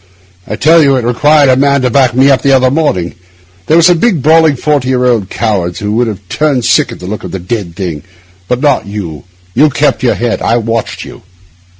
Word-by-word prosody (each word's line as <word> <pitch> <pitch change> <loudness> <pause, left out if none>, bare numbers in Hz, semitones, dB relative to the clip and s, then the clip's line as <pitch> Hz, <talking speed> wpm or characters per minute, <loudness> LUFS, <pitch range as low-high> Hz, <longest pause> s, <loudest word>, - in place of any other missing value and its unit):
I - - -4
tell 165 +2 +4
you, 140 -2 +3
it 125 -3 -2
required 145 +4 +3
a 130 - +4
man 140 0 +1
to 125 - 0
back 130 -3 +2
me 135 +2 +4
up 135 - +2
the 140 - +2
other 130 -1 +3
morning. 135 - -1 0.5
There 160 - +3
are 170 - +4
some 175 0 +4
big, 185 - 0
brawling, 160 -1 +4
forty 140 -1 -1
year 125 -1 0
old 115 -6 0
cowards 95 -6 -2
who 105 -1 -4
would 120 +2 0
have 100 -3 -7
turned 140 +2 -1
sick 140 -6 +2
at - - -10
the 90 - -9
look 105 +3 -6
of - - -6
the - - -5
d 100 +5 -3
d 85 - -13
thing; 85 -4 -6 0.4
but 125 +3 -2
not 145 -7 +1
you—you 90 - -3
kept 145 0 0
your 125 - +1
head. 120 -1 -2
I 115 - +1
watched 115 -1 -3
you. - - -12
125 Hz, 230 wpm, -11 LUFS, 105-145 Hz, 0.5 s, tell